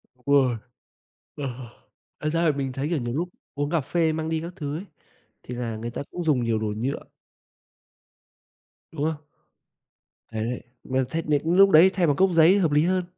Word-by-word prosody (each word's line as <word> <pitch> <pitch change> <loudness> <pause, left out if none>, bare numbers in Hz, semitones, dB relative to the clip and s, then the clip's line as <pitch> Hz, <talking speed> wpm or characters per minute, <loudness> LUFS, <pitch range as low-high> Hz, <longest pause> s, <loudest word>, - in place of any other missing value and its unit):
Ôi. 130 -1 +2 0.8
Ờ, 145 - -6
ờ, 120 -3 -10 0.5
thật 155 - -1
ra 165 +2 +1
thì 145 - -7
mình 135 -1 -2
thấy, 135 +3 -3
kiểu, 170 - +1
nhiều 120 -3 -3
lúc 170 +6 -2 0.3
uống 145 0 -1
cà 165 -1 +1
phê 160 +3 +1
mang 160 0 -3
đi 160 -1 -1
các 170 +2 -7
thứ 150 -4 -4
ấy 190 - -7 0.6
thì 125 - -7
là 120 -2 -3
người 115 +2 -5
ta 120 - -5
cũng 175 - -4
dùng 140 -6 +2
nhiều 115 -2 0
đồ 110 - -2
nhựa. 130 +5 -2 1.9
Đúng 155 -3 -4
không? 155 -1 -2 1.1
Đấy, 110 -1 -3
đấy, 125 +1 -4 0.2
mà 130 0 0
thấy 165 - -1
này 150 -2 +1
lúc 190 +4 +5
đấy 175 +3 +8
thay 180 -2 +2
bằng 145 -3 +2
cốc 190 +3 +4
giấy 165 +4 +6
hợp 170 -6 +2
lý 150 +2 +4
hơn. 185 +1 +1
150 Hz, 200 wpm, -25 LUFS, 130-165 Hz, 1.9 s, đấy